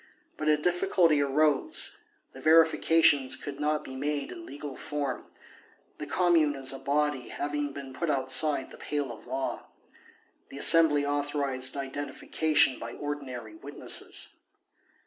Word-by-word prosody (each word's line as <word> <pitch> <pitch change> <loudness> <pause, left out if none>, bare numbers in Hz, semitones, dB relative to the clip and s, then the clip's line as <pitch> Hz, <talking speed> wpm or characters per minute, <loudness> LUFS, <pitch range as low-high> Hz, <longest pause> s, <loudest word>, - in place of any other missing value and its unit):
But 155 - -5
a 150 0 +4
difficulty 175 -2 +2
arose; 145 0 0 0.3
the 130 - -12
verifications 160 -3 +4
could 145 -1 -7
not 150 0 -1
be 130 - -9
made 145 +1 -3
in 170 - -10
legal 140 0 -8
form, 140 -3 -5 0.7
the 150 - -6
Commune 165 -2 +2
as 135 -1 0
a 135 - -7
body 145 -1 -1
having 145 0 -3
been 135 -1 -9
put 170 - -3
outside 135 +1 +2
the - - -12
pale 145 -4 -4
of 115 +1 -13
law. 130 +2 -4 0.8
The - - -10
Assembly 150 -1 +6
authorized 145 -2 -1
identification 145 +1 0
by 115 +1 -7
ordinary 145 - -7
witnesses. 325 - -1
145 Hz, 130 wpm, -28 LUFS, 135-155 Hz, 0.8 s, Assembly